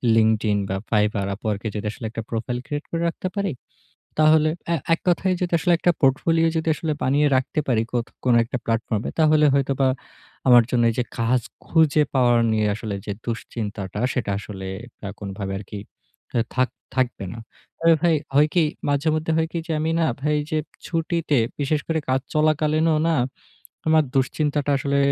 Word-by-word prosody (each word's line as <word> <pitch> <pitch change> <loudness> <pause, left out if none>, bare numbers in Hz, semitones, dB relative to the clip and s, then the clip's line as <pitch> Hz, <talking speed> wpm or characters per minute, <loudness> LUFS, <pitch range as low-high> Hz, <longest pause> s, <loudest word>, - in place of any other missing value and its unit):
Linkedin 110 -2 +3
বা, 95 - -1
Fiverr, 105 -2 +1
Upwork 105 0 -3
এ - - -1
যদি 105 0 -4
আসলে 115 - -8
একটা 115 - -5
profile 120 +2 -2
create 145 0 -4
করে 165 - -1
রাখতে 185 - -5
পারি। 200 -2 0 0.7
তাহলে 155 0 +5 0.2
এ - - +3 0.2
এক - - -6
কথায় 185 +1 +2
যদি 180 -1 -2
আসলে 175 +3 +2
একটা 175 - +3
portfolio 165 +5 +3
যদি 160 0 0 0.3
বানিয়ে 145 +3 +3
রাখতে 130 +3 0
পারি 115 -3 +2
কোত 120 -1 0 0.2
কোন 125 -2 +4
একটা 120 +2 -4
platform 115 -2 -1
এ। - - -2
তাহলে 155 -1 +5
হয়তোবা 135 -1 +2 0.6
আমার 120 -1 +8
জন্য 120 -1 +2
এইযে 120 +2 -1
কাজ 120 +2 +2 0.3
খুঁজে 155 -2 +4
পাওয়া 125 -2 +4 0.2
নিয়ে 110 -1 +2
আসলে 110 -1 -5
যে 105 - -2
দুশ্চিন্তাটা, 105 -4 -4
সেটা 120 -6 -2
আসলে 95 -1 -7 0.4
আ - - -3
কোনভাবে 100 -1 -5
আরকি 100 +1 -8 0.8
থাক 130 0 +2 0.3
থাকবে 125 -6 0
না। 115 - -8 0.4
আর 165 0 +6
ভাই 170 -2 +4 0.2
হয় 150 +2 +5
কি 175 - +5 0.3
মাঝে 145 +2 +1
মধ্যে 155 +1 -1
হয় 160 0 +1
কি? 170 - -2
যে 165 - -2
আমি 160 +1 0
না 165 - +3
ভাই 150 +2 +1
যে 155 - +1 0.3
ছুটিতে, 165 -3 0 0.2
বিশেষ 145 +2 +1
করে 160 -1 0
কাজ 130 +1 +2
চলাকালীনও 155 +1 +2
না 165 - +2 0.7
আমার 155 -1 +5
দুশ্চিন্তাটা 145 +2 0
আসলে 140 0 0
135 Hz, 170 wpm, -23 LUFS, 115-155 Hz, 0.8 s, আমার